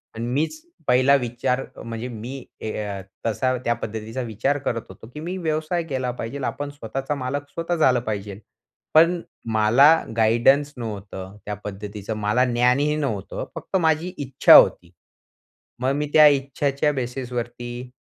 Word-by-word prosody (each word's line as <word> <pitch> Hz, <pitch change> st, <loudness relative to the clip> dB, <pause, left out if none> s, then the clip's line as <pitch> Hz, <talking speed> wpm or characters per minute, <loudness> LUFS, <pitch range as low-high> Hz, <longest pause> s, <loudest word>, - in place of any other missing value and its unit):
अन् 115 Hz, +1 st, -4 dB
मीच 160 Hz, -, -1 dB, 0.3 s
पहिला 130 Hz, +3 st, +5 dB
विचार 125 Hz, +1 st, -1 dB, 0.2 s
म्हणजे 115 Hz, +1 st, -5 dB
मी 125 Hz, +3 st, -7 dB, 0.2 s
ए 110 Hz, -, -3 dB
अ, 100 Hz, -2 st, -5 dB, 0.2 s
तसा 130 Hz, +3 st, +1 dB
त्या 120 Hz, -, +3 dB
पद्धतीचा 110 Hz, +2 st, -5 dB
विचार 120 Hz, +5 st, -1 dB
करत 115 Hz, -1 st, -1 dB
होतो, 110 Hz, -, -12 dB
की 150 Hz, -, -7 dB
मी 180 Hz, +4 st, -4 dB
व्यवसाय 160 Hz, +1 st, -1 dB
केला 130 Hz, -5 st, -2 dB
पाहिजे. 125 Hz, +3 st, -6 dB
आपण 145 Hz, 0 st, -3 dB
स्वतःचा 135 Hz, +1 st, -4 dB
मालक 140 Hz, +2 st, -4 dB
स्वतः 170 Hz, +1 st, -2 dB
झालं 130 Hz, -6 st, +4 dB
पाहिजे. 100 Hz, -1 st, -4 dB, 0.6 s
पण 170 Hz, +2 st, +5 dB, 0.3 s
मला 115 Hz, +7 st, +6 dB, 0.3 s
गाईडन्स 125 Hz, +6 st, +4 dB
नव्हतं, 100 Hz, -3 st, -7 dB
त्या 105 Hz, -, -3 dB
पद्धतीचं 105 Hz, +1 st, -6 dB
मला 105 Hz, +4 st, +2 dB
ज्ञानही 125 Hz, +5 st, +2 dB
नव्हतं. 110 Hz, -10 st, -3 dB
फक्त -, -, -6 dB
माझी 165 Hz, +2 st, +1 dB
इच्छा 135 Hz, -2 st, +5 dB
होती. 85 Hz, -1 st, +6 dB, 0.9 s
मग 130 Hz, +1 st, +1 dB
मी 150 Hz, 0 st, -1 dB
त्या 155 Hz, -1 st, +9 dB
इच्छाच्या 140 Hz, +1 st, +1 dB
बेसिसवरती 120 Hz, -1 st, -5 dB
125 Hz, 145 wpm, -23 LUFS, 115-145 Hz, 0.9 s, त्या